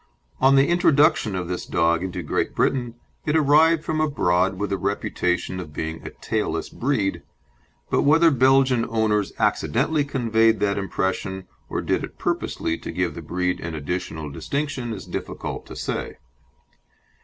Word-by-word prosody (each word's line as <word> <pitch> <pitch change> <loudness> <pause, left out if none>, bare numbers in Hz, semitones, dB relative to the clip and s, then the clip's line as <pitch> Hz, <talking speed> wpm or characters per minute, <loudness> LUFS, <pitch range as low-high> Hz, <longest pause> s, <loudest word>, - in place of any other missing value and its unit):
On 135 +1 +5
the 135 +1 +5
introduction 155 - +3
of 90 -2 -3
this 90 0 -3
dog 85 0 +1
into 95 -1 -4
Great - - -1
Britain 120 -3 0 0.3
it 150 - 0
arrived 155 +2 +4
from 155 -1 -1
abroad 95 - +1
with 105 0 -3
the 100 - +1
reputation 95 -2 -1
of 80 -5 -8
being 80 +1 -4
a - - -6
tailless - - -3
breed, 115 -7 -1 0.7
but - - +3
whether 160 +3 +5
Belgian 130 -2 +4
owners 110 -3 +1
accidentally 145 +5 +1
conveyed 115 -5 +2
that 100 -1 +1
impression 95 0 -2 0.2
or - - -2
did - - 0
it - - -8
purposely 80 - -2
to - - -6
give 90 -3 -1
the 85 - -7
breed 90 +3 -1
an 80 -1 -5
additional 80 -1 -4
distinction 130 - -3
is 110 - -6
difficult - - -5
to - - -9
say. - - -4
110 Hz, 155 wpm, -23 LUFS, 90-140 Hz, 0.7 s, On